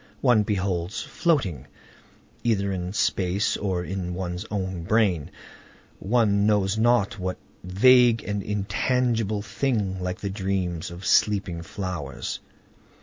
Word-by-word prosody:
One 120 Hz, -5 st, +5 dB
beholds 95 Hz, -3 st, -2 dB
floating, 100 Hz, -, 0 dB, 0.8 s
either 100 Hz, -4 st, +1 dB
in 90 Hz, -1 st, -3 dB
space 95 Hz, 0 st, +1 dB
or 95 Hz, -3 st, -2 dB
in 90 Hz, -1 st, -4 dB
one's 90 Hz, +2 st, -4 dB
own 95 Hz, -3 st, -3 dB
brain, 95 Hz, -5 st, +1 dB, 0.7 s
one 105 Hz, -2 st, +2 dB
knows 100 Hz, -2 st, +2 dB
not 110 Hz, -2 st, +2 dB
what 90 Hz, 0 st, -3 dB, 0.3 s
vague 120 Hz, +5 st, +5 dB
and 105 Hz, 0 st, -2 dB
intangible 110 Hz, +1 st, 0 dB
thing, 105 Hz, -4 st, -1 dB
like 90 Hz, 0 st, -3 dB
the 100 Hz, -, -3 dB
dreams 95 Hz, -4 st, -2 dB
of 85 Hz, +2 st, -9 dB
sleeping 100 Hz, -5 st, +2 dB
flowers. 85 Hz, -7 st, -5 dB
100 Hz, 115 wpm, -25 LUFS, 90-110 Hz, 0.8 s, One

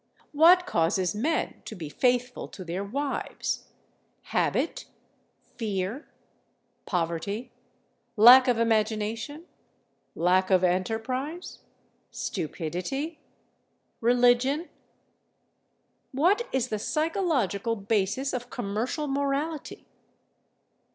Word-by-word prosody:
What 345 Hz, +4 st, +6 dB
causes 180 Hz, -, +1 dB
men 295 Hz, +10 st, -1 dB
to 220 Hz, -, -7 dB
be 165 Hz, -5 st, -6 dB
faithful 250 Hz, -, 0 dB
to 185 Hz, -, -10 dB
their 175 Hz, +3 st, -3 dB
wives: 275 Hz, +7 st, -3 dB, 0.6 s
habit, -, -, -1 dB, 0.7 s
fear, 210 Hz, +4 st, -3 dB, 0.8 s
poverty, 180 Hz, +6 st, -2 dB, 0.7 s
lack 250 Hz, +5 st, +9 dB
of 245 Hz, -2 st, +3 dB
imagination, 225 Hz, +6 st, -1 dB, 0.7 s
lack 185 Hz, +2 st, +2 dB
of 185 Hz, -1 st, +4 dB
enterprise, 230 Hz, -, -2 dB, 0.5 s
stupidity, 185 Hz, -, -4 dB, 0.8 s
religion? 245 Hz, +6 st, +3 dB, 1.4 s
What 365 Hz, -, +2 dB
is 255 Hz, -1 st, 0 dB
the 215 Hz, -, -2 dB
psychological 300 Hz, -, 0 dB
basis 210 Hz, +5 st, -1 dB
of 245 Hz, -1 st, -4 dB
commercial 240 Hz, +6 st, -3 dB
morality? 280 Hz, +2 st, -2 dB
240 Hz, 80 wpm, -27 LUFS, 200-280 Hz, 1.4 s, lack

